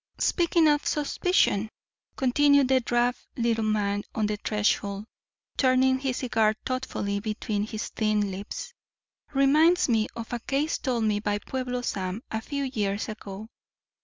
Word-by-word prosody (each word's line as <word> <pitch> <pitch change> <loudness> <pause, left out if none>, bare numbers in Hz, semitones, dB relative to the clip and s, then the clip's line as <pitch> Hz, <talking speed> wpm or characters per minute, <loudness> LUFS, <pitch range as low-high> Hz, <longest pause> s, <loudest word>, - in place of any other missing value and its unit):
"Speaking 340 -2 +3
of 295 -1 +3
suspicion," 290 - +1 0.5
continued 280 +1 +4
the 265 -1 +5
drab 240 0 +1 0.2
little 230 -2 +1
man 205 -1 0
on 215 - +1
the 210 0 -1
threshold, 205 -1 -1 0.5
turning 260 0 +3
his 265 -2 -2
cigar 220 -4 +1
thoughtfully 230 -6 -2
between 210 0 -2
his 220 0 -5
thin 210 -2 0
lips, 205 - -6 0.6
"reminds 305 +6 +4
me 220 -2 +2
of 230 +1 -6
a 240 - -1
case 280 +6 -1
told 245 -4 -1
me 210 -1 +1
by 205 0 -1
Pueblo 250 +2 -4
Sam, 190 +1 -3
a 220 - -2
few 280 +4 -3
years 210 -5 -2
ago. 210 0 -8
230 Hz, 140 wpm, -27 LUFS, 210-265 Hz, 0.6 s, the